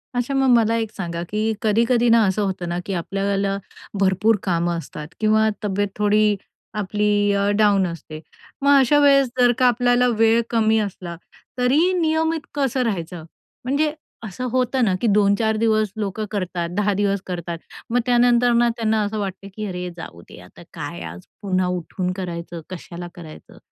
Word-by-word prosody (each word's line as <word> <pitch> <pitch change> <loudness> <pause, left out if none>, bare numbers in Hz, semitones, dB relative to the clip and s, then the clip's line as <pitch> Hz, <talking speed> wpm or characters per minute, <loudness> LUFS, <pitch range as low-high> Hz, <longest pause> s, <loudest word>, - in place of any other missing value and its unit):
अच्छा 245 +3 -1
मग 270 -1 +2
मला 230 -1 +3
एक 220 -1 -4
सांगा 170 -2 -4
की 210 - -2 0.2
कधी-कधी 235 +3 +2
ना 230 0 +6
असं 190 +2 0
होतं 185 -3 -2
ना, 175 +1 -2
की 195 - -3
आपल्याला 195 +2 -1 0.4
भरपूर 195 +3 +3
कामं 170 -2 0
असतात 150 -2 -8
किंवा 220 0 +3 0.2
तब्येत 205 0 0
थोडी 210 0 +3 0.5
आपली 205 +1 +1
अ, 200 0 +1
डाऊन 200 -3 +3
असते. 160 -2 -8 0.4
मग 280 0 +5
अशा 290 +3 +4
वेळेस 275 -2 +5
जर 245 -1 +6
का 255 - +5
आपल्याला 245 +1 +3
वेळ 225 +1 +4
कमी 220 -1 +2
असला, 185 -4 -5 0.4
तरी 280 +9 +3
नियमित 320 0 +1
कसं 270 -3 0
राहायचं? 175 -6 -3 0.4
म्हणजे 290 +4 +1 0.4
असं 210 +6 -7
होतं 255 0 +1
ना, 190 - +2
की 235 - +1
2-4 210 +1 +3
दिवस 215 -2 +1
लोकं 210 +1 -3
करतात, 185 -4 -3
10 205 0 +2
दिवस 200 -1 0
करतात, 170 -2 -5 0.3
मग 245 +2 +2
त्यानंतर 245 0 +4
ना 235 0 +4
त्यांना 220 -1 +1
असं 210 +1 -3
वाटतं 195 -1 -5
की, 215 - -4
"अरे, 180 -1 -4
जाऊ 85 - -9
दे - - -12
आता. - - -15
काय - - -6
आज 90 +1 -12 0.2
पुन्हा 185 -2 0
उठून 180 +1 -3
करायचं, 170 -2 -6
कशाला 175 -1 -8
करायचं?" 160 -3 -12
210 Hz, 165 wpm, -21 LUFS, 185-235 Hz, 0.5 s, ना